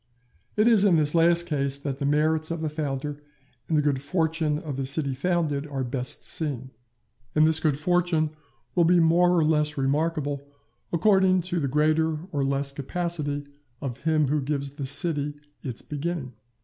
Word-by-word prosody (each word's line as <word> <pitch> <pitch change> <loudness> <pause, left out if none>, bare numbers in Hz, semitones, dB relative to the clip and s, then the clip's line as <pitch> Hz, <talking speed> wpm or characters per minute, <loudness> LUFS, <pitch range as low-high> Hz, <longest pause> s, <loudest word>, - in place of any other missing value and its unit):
It 215 +2 +4
is 220 -4 +5
in 195 -4 +5
this 150 -1 +1
last 170 +1 +4
case 140 -3 -1
that 140 -1 -4
the 140 - 0
merits 155 +2 +2
of 165 -1 -3
a 155 - 0
founder 145 -1 -4 0.5
and 160 - +2
the 150 - +3
good 140 -3 +1
fortune 160 0 0
of 150 -3 -5
the 135 - -2
city 140 +1 -1
founded 150 -1 -1
are 135 -2 -3
best 125 0 -4
seen; 135 -5 -2 0.6
and 155 0 +5
this 160 0 +4
good 155 -3 +1
fortune 165 -1 +1 0.4
will 175 - +4
be 175 +1 +5
more 175 +2 +4
or 165 - +4
less 150 -1 +1
remarkable 145 +1 0 0.5
according 190 0 +4
to 175 0 -2
the 140 - 0
greater 155 +2 +1
or 145 -2 0
less 140 0 0
capacity 145 0 -3 0.4
of 130 -2 -5
him 155 -2 +1
who 150 0 +1
gives 140 0 -2
the 140 -1 -5
city 145 +1 -1 0.3
its 125 -5 -5
beginning. 150 -3 -4
150 Hz, 175 wpm, -26 LUFS, 140-165 Hz, 0.6 s, is